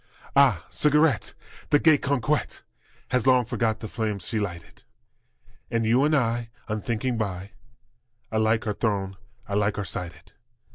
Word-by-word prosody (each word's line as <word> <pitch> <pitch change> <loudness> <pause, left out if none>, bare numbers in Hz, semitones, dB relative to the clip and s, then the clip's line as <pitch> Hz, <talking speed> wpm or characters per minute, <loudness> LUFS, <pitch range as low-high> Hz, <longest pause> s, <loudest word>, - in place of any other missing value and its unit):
Ah, 125 - +4
cigarette! 150 -4 +2 0.3
The 145 - +5
gay 155 -1 +5
coquette 140 +2 -1 0.5
Has 125 0 0
long 125 -2 +5
forgot 110 -1 -1
the 110 - -5
flames 105 -5 -3
she 110 - -1
lighted, 85 -5 -6 0.9
And 115 -1 0
you 120 +5 +3
and 150 +1 +3
I 120 -3 0 0.2
unthinking 115 +2 -2
by 100 -2 -4 0.8
Alike 110 +1 +1
are 105 - 0
thrown, 100 -3 -1 0.3
alike 105 +1 0
are 105 - -2
slighted. 90 0 -6
110 Hz, 135 wpm, -25 LUFS, 105-125 Hz, 0.9 s, The